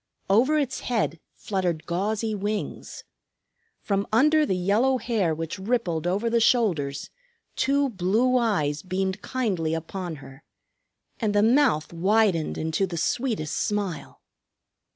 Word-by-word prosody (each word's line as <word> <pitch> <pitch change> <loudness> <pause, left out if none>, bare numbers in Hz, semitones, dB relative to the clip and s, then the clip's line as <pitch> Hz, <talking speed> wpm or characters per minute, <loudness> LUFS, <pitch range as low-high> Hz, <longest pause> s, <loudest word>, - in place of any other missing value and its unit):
Over 260 +9 +4
its 280 -4 -1
head 220 -9 -1 0.2
fluttered 180 -6 -2
gauzy 215 +5 -1
wings. 205 +1 -4 0.8
From 200 -1 -1
under 300 +7 +4
the 190 - +1
yellow 215 +9 +2
hair 215 -9 0
which 165 +4 -5
rippled 190 -6 -1
over 200 +6 0
the 230 0 +2
shoulders 175 - +1 0.4
two 280 +1 +2
blue 215 +6 +1
eyes 155 -12 +1
beamed 190 +2 -2
kindly 185 -10 -1
upon 170 +1 -5
her, 135 0 -13 0.8
and 215 -3 0
the 205 - +4
mouth 230 - +3
widened 190 -1 +2
into 160 +5 -1
the 170 -2 -5
sweetest 205 - -1
smile. 200 -7 -3
200 Hz, 125 wpm, -25 LUFS, 170-230 Hz, 0.8 s, Over